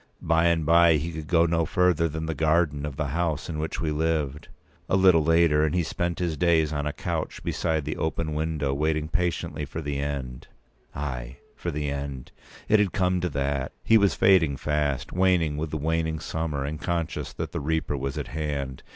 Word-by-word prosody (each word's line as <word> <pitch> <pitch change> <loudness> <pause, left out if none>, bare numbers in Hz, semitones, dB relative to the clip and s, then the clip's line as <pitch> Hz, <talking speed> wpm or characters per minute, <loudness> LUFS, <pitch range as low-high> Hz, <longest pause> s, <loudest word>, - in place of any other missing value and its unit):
By 80 +1 +2
and 85 -2 +2
by 85 0 +6
he 80 +3 -2
could 80 -1 -7
go 85 -1 +4
no 85 0 +1
further 85 0 +2
than 80 +1 -4
the 80 - -2
garden 75 -1 +1
of 70 - -6
the 75 -1 -2
house 80 +1 -1
in 80 -2 -3
which 80 +1 -3
we 80 -2 -1
lived. 75 -2 -1 0.4
A - - +3
little 95 -4 +5
later, 80 -1 +4
and 80 +2 +1
he 90 - +2
spent 85 +2 -2
his 85 -3 -1
days 80 -1 +2
on 75 0 -2
a - - -1
couch - - -4
beside 80 -4 -1
the 75 - -3
open 80 -1 -2
window, 75 -3 -1
waiting 75 +1 0
patiently 90 -4 -1
for 75 +3 -5
the 70 -2 -3
end. 70 -3 -4 0.5
Ay, 60 -4 -5 0.2
for - - -4
the 75 0 -2
end! 70 -2 -5 0.4
It 110 0 +5
had 100 -3 +1
come 90 -3 +1
to 90 - 0
that. 70 -2 -2
He 115 0 +5
was 100 -2 +3
fading 85 -8 +4
fast, 75 -1 -1
waning 90 -5 +2
with 75 +1 -3
the 80 - -3
waning 80 +1 -1
summer, 80 -3 -3
and 75 +3 -5
conscious 85 -2 -2
that - - -5
the - - -3
Reaper 80 0 -1
was 70 0 -3
at - - -4
hand. 70 -4 -3
80 Hz, 205 wpm, -26 LUFS, 75-85 Hz, 0.5 s, by